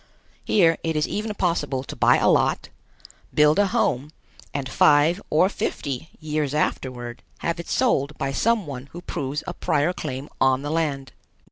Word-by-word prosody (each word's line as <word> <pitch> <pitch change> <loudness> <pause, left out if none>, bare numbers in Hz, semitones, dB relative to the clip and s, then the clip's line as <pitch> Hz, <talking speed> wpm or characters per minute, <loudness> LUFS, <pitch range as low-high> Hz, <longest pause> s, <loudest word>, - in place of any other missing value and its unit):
Here 165 -5 +3
it 160 -1 -1
is 150 0 +1
even 210 0 -3
possible 150 -8 -1
to - - -8
buy - - +4
a - - +2
lot, - - +2 0.6
build 150 +3 +4
a 205 - +4
home, 150 - 0 0.4
and 140 -2 -3
five 150 +7 +4
or 160 +5 +4
fifty 140 -6 -4
years 150 -2 -2
afterward 125 -5 -2 0.2
have 170 0 -2
it 170 - -7
sold 150 - +1
by 135 0 -2
some 225 +7 +1
one 135 -2 -7
who 175 - -7
proves 140 +3 -3
a 180 - -4
prior 160 -1 0
claim 135 -4 -5
on 130 0 +3
the 145 - -3
land. 145 -5 -1
150 Hz, 165 wpm, -24 LUFS, 135-170 Hz, 0.6 s, buy